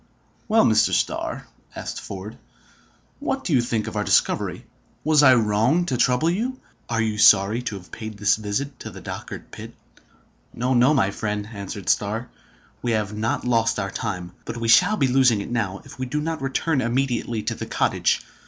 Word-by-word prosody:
"Well, 225 0 +4
Mr. 110 -1 +3
Starr," - - -1 0.3
asked - - -6
Ford, 100 +3 -8 0.8
"what 270 -2 -2
do 175 - -1
you 130 - +5
think 115 -2 -1
of - - -6
our 105 - 0
discovery? - - +1 0.4
Was 155 -1 +4
I 130 -3 +7
wrong 115 +9 +2
to 135 - -1
trouble 125 +7 +2
you? 245 +8 -2 0.3
Are 115 -1 0
you 110 -1 -2
sorry 105 +1 +5
to 115 -4 -4
have 90 -2 -11
paid 110 -1 -7
this 105 +1 +3
visit 125 +6 -3
to - - -7
the - - -10
Dochart - - -8
pit?" - - -10 0.8
"No, 125 +2 0
no, 130 +5 +4
my 130 - +4
old 100 - -3
friend!" 105 -1 -3
answered 100 -1 -7
Starr. 110 +4 0 0.5
"We 120 -1 0
have 105 -1 -1
not 110 +3 -1
lost 115 -2 +2
our 100 -2 -2
time; 90 -1 -4
but 115 - -6
we 115 -1 -2
shall 185 - +5
be 140 - +2
losing 130 -4 +4
it 100 - -6
now, 100 -5 -2
if - - -13
we 130 - -2
do 150 +4 -2
not 160 0 -3
return 135 +2 0
immediately 120 -3 -1
to - - -1
the - - -6
cottage. - - +1
115 Hz, 190 wpm, -23 LUFS, 105-135 Hz, 0.8 s, I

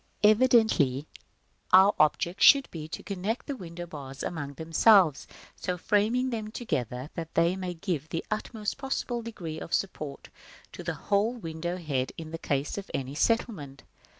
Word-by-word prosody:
Evidently 215 - +4 0.7
our 190 +2 +8
object 170 +4 +2
should 275 -1 +7
be 155 -2 -6
to - - -7
connect 200 +4 -3
the 285 - -4
window 175 -5 -7
bars 140 -5 -8
among 145 -4 -4
themselves, 165 0 +4 0.3
so 180 -1 -3
framing 225 +7 +1
them 220 -2 -3
together 130 - -3
that 165 -1 -7
they 170 +2 +3
may 185 -2 -4
give 160 -4 -3
the 165 - -3
utmost 215 +1 -3
possible 265 -3 -2
degree 175 -9 -6
of 165 - -1
support 155 -7 -4 0.4
to - - -8
the 170 -2 -3
whole 205 +8 +1
window 170 -5 -4
head 140 -7 -2
in 165 0 -6
case 140 +6 -1
of 195 - -10
any 135 0 -3
settlement. 155 - -1
175 Hz, 150 wpm, -28 LUFS, 155-215 Hz, 0.7 s, our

